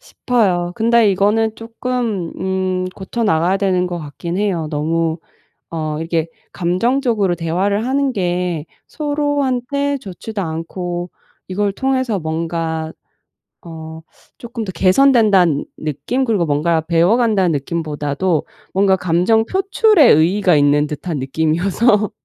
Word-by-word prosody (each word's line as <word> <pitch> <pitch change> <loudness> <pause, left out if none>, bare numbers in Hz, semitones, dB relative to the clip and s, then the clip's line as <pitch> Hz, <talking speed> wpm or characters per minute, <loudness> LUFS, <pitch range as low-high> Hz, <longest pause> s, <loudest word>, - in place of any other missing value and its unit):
싶어요. 185 -8 0
근데 230 -2 +3
이거는 215 +3 +1
쪼끔 230 -5 -3
음 185 0 -1
고쳐 205 +5 -4
나가야 180 0 +2
되는 185 -2 +1
것 175 -1 -4
같긴 170 +4 -5
해요. 185 -6 0
너무 160 +2 -1 0.5
어 155 -2 -3
이게 165 0 -1 0.2
감정적으로 210 +2 +1
대화를 190 +7 -1
하는 275 0 +1
게 180 -5 -2 0.2
서로한테 285 -2 -1
좋지도 200 -1 -6
않고 175 +2 -4 0.4
이걸 200 +1 -1
통해서 260 -3 0
뭔가 160 0 -3 0.7
어 160 -1 -9 0.4
쪼끔 235 -1 -6
더 190 - -4
개선된다는 195 - +4
느낌? 155 - -2
그리고 210 -8 +1
뭔가 160 +2 +1
배워 170 +5 +3
간다는 205 -8 +2
느낌보다도 150 +2 -2 0.3
뭔가 190 0 +3
감정 180 +6 +2
표출에 390 - +4
의의가 180 +3 +3
있는 145 +1 +3
듯한 155 +1 -4
느낌이어서 180 - +1
185 Hz, 270 characters per minute, -18 LUFS, 165-225 Hz, 0.7 s, 개선된다는